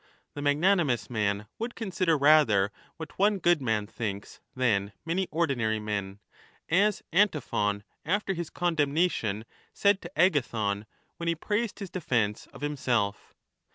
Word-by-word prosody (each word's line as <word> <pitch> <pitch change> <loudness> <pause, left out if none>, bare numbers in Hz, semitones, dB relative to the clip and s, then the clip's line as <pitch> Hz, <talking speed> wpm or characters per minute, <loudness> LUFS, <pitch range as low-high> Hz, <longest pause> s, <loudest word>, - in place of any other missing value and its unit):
The 145 - -6
magnanimous 145 - +2
man 105 -2 0
would 235 +2 -4
consider 185 -6 0
rather 135 -10 +5 0.3
what 160 +2 -9
one 205 +1 +4
good 175 -4 +3
man 110 -4 0
thinks 105 -2 -5 0.2
than 105 -6 +1
many 180 +3 0
ordinary 130 -10 0
men, 100 -2 -4 0.5
as 200 +5 +2
Antiphon 140 - +1 0.2
after 195 +4 0
his 170 -2 -4
condemnation 155 - 0 0.3
said 200 -1 +3
to 175 0 -10
Agathon 115 - +1 0.3
when 170 - -5
he 170 - +2
praised 210 +6 -2
his 195 -4 -7
defence 120 - -1
of - - -14
himself. 125 -8 -1
145 Hz, 130 wpm, -28 LUFS, 110-175 Hz, 0.5 s, rather